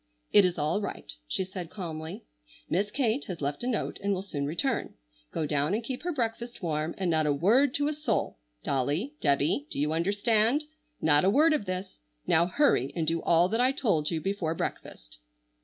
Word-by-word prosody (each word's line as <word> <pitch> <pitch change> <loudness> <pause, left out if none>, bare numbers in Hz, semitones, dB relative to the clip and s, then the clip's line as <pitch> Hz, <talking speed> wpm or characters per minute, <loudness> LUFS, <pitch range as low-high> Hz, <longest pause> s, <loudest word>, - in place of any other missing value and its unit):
"It 205 -2 +7
is 180 -1 0
all 155 +7 0
right!" 130 - -6
she 190 - 0
said 185 -2 -7
calmly. 160 - -6 0.4
"Miss 200 +5 0
Kate 250 +2 0
has 180 -3 -6
left 145 0 -3
a - - -2
note, 245 -4 -2
and 200 0 +1
will 185 - -4
soon 145 -7 -3
return. 235 - -1 0.4
Go 160 - -2
down 150 +5 +1
and 230 - -2
keep 250 +2 -5
her 355 - -2
breakfast 235 - -3
warm, 155 0 -1
and 185 -3 0
not 155 -1 +2
a - - +3
word 235 - +3
to 290 0 +1
a 305 - 0
soul! 285 - -2 0.2
Dolly, 145 - -1
Debby, 145 0 +1
do - - -7
you 150 +2 +1
understand? 210 - +2 0.4
Not 150 -1 +4
a 190 - +4
word 310 +9 +5
of 295 -9 -1
this! 185 - -5 0.3
Now 170 +2 +3
hurry 180 - +2
and 165 - 0
do 165 +1 0
all 170 +1 +4
that 225 +4 +1
I 255 +1 +5
told 200 - 0
you 165 - -1
before 170 -2 -2
breakfast." - - -6
185 Hz, 200 wpm, -28 LUFS, 155-230 Hz, 0.4 s, It